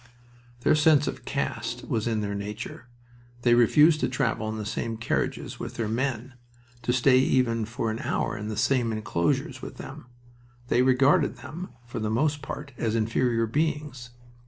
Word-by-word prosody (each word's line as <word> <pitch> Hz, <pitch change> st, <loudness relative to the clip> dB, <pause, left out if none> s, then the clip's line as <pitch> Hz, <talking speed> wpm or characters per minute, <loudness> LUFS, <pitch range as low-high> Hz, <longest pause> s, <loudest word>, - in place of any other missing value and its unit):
Their -, -, +4 dB
sense 150 Hz, -1 st, +5 dB
of -, -, -5 dB
caste 120 Hz, -3 st, -3 dB
was 115 Hz, -4 st, -1 dB
in 110 Hz, -2 st, 0 dB
their 100 Hz, -1 st, -2 dB
nature. 105 Hz, +5 st, -6 dB, 0.6 s
They 120 Hz, -, +5 dB
refused 150 Hz, +7 st, +5 dB
to -, -, 0 dB
travel 115 Hz, -4 st, -1 dB
in 110 Hz, -, -4 dB
the 105 Hz, -, -4 dB
same 115 Hz, +1 st, -3 dB
carriages 115 Hz, -, -2 dB
with -, -, -6 dB
their 115 Hz, -2 st, -2 dB
men, 130 Hz, +2 st, -2 dB, 0.5 s
to 120 Hz, -, 0 dB
stay 130 Hz, +1 st, +5 dB
even 125 Hz, -4 st, +2 dB
for 115 Hz, 0 st, -2 dB
an 110 Hz, -, -4 dB
hour -, -, -1 dB
in 105 Hz, 0 st, -5 dB
the 110 Hz, -1 st, -4 dB
same 120 Hz, 0 st, +2 dB
inclosures 105 Hz, -6 st, -1 dB
with -, -, -8 dB
them. -, -, -9 dB, 0.6 s
They 125 Hz, -, +4 dB
regarded 130 Hz, +2 st, +4 dB
them, 175 Hz, +4 st, -8 dB, 0.2 s
for 120 Hz, -, -6 dB
the 110 Hz, -1 st, -1 dB
most 145 Hz, +6 st, +1 dB
part, 140 Hz, +1 st, -6 dB
as 115 Hz, -1 st, 0 dB
inferior 115 Hz, +1 st, +1 dB
beings. 145 Hz, -1 st, -2 dB
120 Hz, 170 wpm, -26 LUFS, 110-135 Hz, 0.6 s, sense